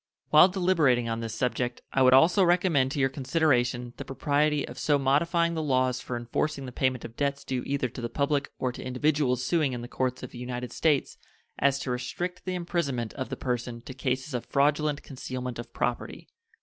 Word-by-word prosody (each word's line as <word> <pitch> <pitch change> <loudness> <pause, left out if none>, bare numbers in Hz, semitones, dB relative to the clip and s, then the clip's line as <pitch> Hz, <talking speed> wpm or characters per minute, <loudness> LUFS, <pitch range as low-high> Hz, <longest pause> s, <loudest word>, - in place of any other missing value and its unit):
While 155 +4 +8
deliberating 165 -10 +2
on 115 0 -2
this 115 -1 -4
subject 125 0 -2
I 135 - +2
would 130 0 +7
also 175 +8 +5
recommend 175 -7 +3
to 145 - -3
your 135 - +4
consideration 130 -4 0
the - - -5
propriety 145 +2 0
of - - -9
so 145 -2 +3
modifying 170 +5 +2
the 160 - -2
laws 130 -3 +1
for 120 - -4
enforcing 135 +4 -2
the 125 - -7
payment 130 0 -1
of 115 - -9
debts 140 +1 -1
due 130 -2 -2
either 140 -2 0
to 125 - -8
the 120 - -3
public 140 +2 0
or 130 - -1
to - - -9
individuals 130 -1 +1
suing 155 -5 +1
in 120 -1 -5
the - - -6
courts 130 0 -2
of - - -7
the 120 - -9
United 125 -1 -5
States 150 -4 +1 0.4
as 140 0 +3
to 130 - -3
restrict 175 +8 -4
the 185 -1 -2
imprisonment 150 -10 -2
of 130 - -5
the - - -4
person 125 -2 -3
to 125 - -9
cases 130 +2 -2
of 125 - -3
fraudulent 145 +1 +1
concealment 125 -2 -6
of 120 - -7
property. - - -3
135 Hz, 200 wpm, -27 LUFS, 125-150 Hz, 0.4 s, While